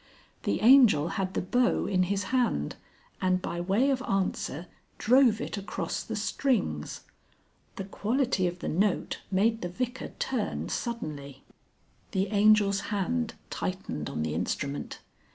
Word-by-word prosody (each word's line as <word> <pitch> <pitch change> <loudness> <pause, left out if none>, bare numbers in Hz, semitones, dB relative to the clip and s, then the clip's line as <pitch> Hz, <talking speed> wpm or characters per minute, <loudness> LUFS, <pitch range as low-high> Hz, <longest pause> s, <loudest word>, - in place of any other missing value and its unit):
The 100 - 0
Angel 225 - +6
had 190 -1 -3
the - - 0
bow 245 +6 +2
in 185 -2 +1
his 200 0 0
hand, 240 - +1 0.5
and 185 0 +2
by 175 -1 -4
way 205 +10 +2
of 260 -1 0
answer 185 -4 -1 0.3
drove 245 -2 +4
it 215 - -4
across 200 - -3
the - - -5
strings. 200 - -1 0.7
The 195 - -4
quality 210 0 0
of 175 0 -4
the - - -3
note 195 +4 0
made 220 +4 +2
the 175 - -3
Vicar 250 +7 -4
turn 250 -6 -2
suddenly. 150 - -5 0.7
The 190 +1 0
Angel's 205 -1 +4
hand 220 +4 -1 0.2
tightened 180 - -4
on 75 - -3
the 80 -1 -2
instrument. 140 - -3
200 Hz, 135 wpm, -28 LUFS, 175-235 Hz, 0.7 s, Angel